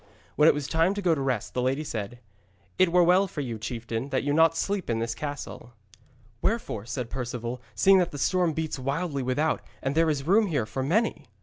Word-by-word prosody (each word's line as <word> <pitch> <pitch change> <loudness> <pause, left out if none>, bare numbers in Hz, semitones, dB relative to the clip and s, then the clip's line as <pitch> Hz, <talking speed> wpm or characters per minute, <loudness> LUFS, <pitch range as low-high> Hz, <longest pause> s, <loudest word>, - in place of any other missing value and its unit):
When 150 - +5
it - - +6
was 145 -1 -3
time 165 +7 +1
to 205 - -3
go 175 -2 +4
to 145 - -2
rest, 130 -6 -2
the 125 - -1
lady 135 +4 0
said: 115 -4 -5 0.6
'It 185 -2 +4
were 180 0 +5
well 180 +3 +4
for 150 - -5
you, 120 -5 -4
chieftain, 115 +3 -4
that 130 -1 0
you 145 +1 0 0.2
sleep 195 +3 -2
not - - 0
in - - -1
this 115 0 -2
castle.' 145 -2 -7 0.7
'Wherefore,' 190 - -2
said 120 0 -4
Perceval, 125 -1 -4
'seeing 190 - +6
that 180 -1 +1
the 145 - -8
storm 175 +2 +1
beats 160 -2 -3
wildly 140 +2 -2
without 130 +5 0 0.2
and 135 - -2
there 165 +1 +3
is 140 -3 -1
room 205 +5 +4
here 145 - 0
for 110 +5 -4
many?' 195 - 0
140 Hz, 215 wpm, -27 LUFS, 125-170 Hz, 0.7 s, it